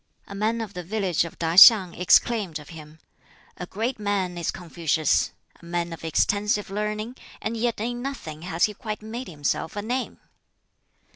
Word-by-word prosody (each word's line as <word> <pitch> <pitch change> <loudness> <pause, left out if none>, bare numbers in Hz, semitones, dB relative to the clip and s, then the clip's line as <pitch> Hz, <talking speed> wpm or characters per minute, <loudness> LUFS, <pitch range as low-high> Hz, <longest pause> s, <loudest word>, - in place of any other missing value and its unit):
A - - -9
man 220 +3 -1
of 215 -3 -6
the 180 - -5
village 185 -2 0
of 170 - -10
Tah 165 -1 -1
hiang 190 -3 +9
exclaimed 185 -1 +3
of 150 -1 -13
him, 155 -1 -12 0.6
"A 180 - -6
great 225 +6 -3
man 200 -3 -1
is 170 -2 -3
Confucius! 165 -3 0 0.3
a - - -22
man 170 0 -2
of 165 - -10
extensive 205 +5 0
learning, 210 +4 -3 0.2
and 225 - -3
yet 230 -1 -1
in 240 +2 -3
nothing 170 - -6
has 170 -1 -2
he 210 - +3
quite 215 -1 -6
made 235 +4 -6
himself 155 +2 -2
a 205 - -3
name!" 250 +4 -3
200 Hz, 170 wpm, -25 LUFS, 170-220 Hz, 0.6 s, hiang